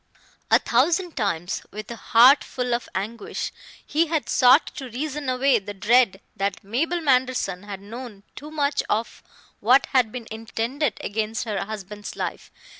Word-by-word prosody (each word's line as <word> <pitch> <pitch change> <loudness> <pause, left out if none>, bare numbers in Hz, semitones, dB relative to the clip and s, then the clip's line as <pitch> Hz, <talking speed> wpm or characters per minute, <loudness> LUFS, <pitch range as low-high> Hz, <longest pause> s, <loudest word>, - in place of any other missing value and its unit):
A - - +7
thousand 330 +8 +1
times, 190 -5 -1
with 215 +2 -8
a - - -5
heart 245 +5 +6
full 250 -2 -3
of 235 - -2
anguish, 210 +4 -4 0.3
he 320 +3 +1
had 315 -2 -1
sought 255 +4 +6
to 265 -3 -6
reason 285 +3 -4
away 255 -1 +3
the 205 +1 -8
dread 210 0 +3
that 195 -1 -2
Mabel 315 - -1
Manderson 255 - +1
had 200 -1 -8
known 220 -1 -9
too 295 +3 -9
much 290 -2 0
of 225 +2 -2 0.4
what 250 +6 +5
had 250 -5 +3
been 245 -1 -6
intended 225 +4 -2
against 220 +1 -2
her 210 -3 -2
husband's 210 -1 -7
life. - - -5
235 Hz, 155 wpm, -24 LUFS, 210-270 Hz, 0.4 s, A